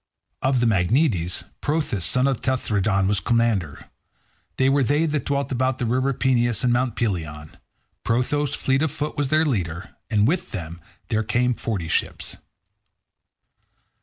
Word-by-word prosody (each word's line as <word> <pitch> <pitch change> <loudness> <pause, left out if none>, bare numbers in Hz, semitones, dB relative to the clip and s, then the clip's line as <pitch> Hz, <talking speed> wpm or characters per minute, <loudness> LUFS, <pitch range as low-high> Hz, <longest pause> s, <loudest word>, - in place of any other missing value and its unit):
Of 130 -2 +2
the - - +3
Magnetes, 95 - +1 0.2
Prothous 145 - -1
son 125 +1 +2
of 135 -4 0
Tenthredon 100 -7 +1
was 100 0 +2
commander. 110 -5 0 0.7
They 130 - +3
were 140 +1 +3
they 145 +5 +2
that 150 -4 -2
dwelt 140 -1 -1
about 130 0 0
the 125 - -2
river 130 +4 +1
Peneus 120 -5 +1
and 125 -1 +3
Mt. 120 -1 0
Pelion. 80 -9 -3 0.5
Prothous, 135 +5 0
fleet 135 +1 +1
of 160 - +2
foot, 150 0 -3
was 145 -2 0
their 155 +3 +3
leader, 90 - -2
and 105 -1 +3
with 175 +5 -1
him 85 -3 -6 0.3
there 110 - +1
came 120 +3 +1
forty 100 -7 -3
ships. - - -2
120 Hz, 150 wpm, -23 LUFS, 100-135 Hz, 0.7 s, the